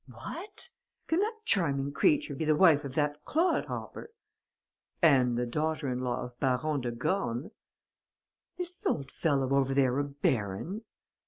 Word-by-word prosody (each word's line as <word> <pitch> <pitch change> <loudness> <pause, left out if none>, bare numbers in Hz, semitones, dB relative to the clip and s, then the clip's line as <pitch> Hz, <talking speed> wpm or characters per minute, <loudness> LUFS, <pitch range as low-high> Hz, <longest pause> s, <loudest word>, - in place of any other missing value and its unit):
"'What! 405 0 -8 0.4
Can 320 - +1
that 440 +2 -2
charming 140 -7 +1
creature 295 - +2
be 160 - -3
the 155 0 +3
wife 155 -3 +5
of 140 -2 -7
that 150 -1 0
clod 335 +4 +1
hopper?' - - -6 0.9
"'And 130 -7 +4
the 125 - 0
daughter 150 +4 -1
in 125 0 -2
law 125 0 -2
of 125 0 -10
Baron 135 +2 +1
de 120 - -2
Gorne.' 120 +1 -2 1.1
"'Is 360 0 -5
the - - -1
old 140 -3 -2
fellow 135 -4 +1
over 135 -1 +2
there 135 -1 +3
a - - +2
baron?' 140 - -2
145 Hz, 155 wpm, -30 LUFS, 130-170 Hz, 1.1 s, wife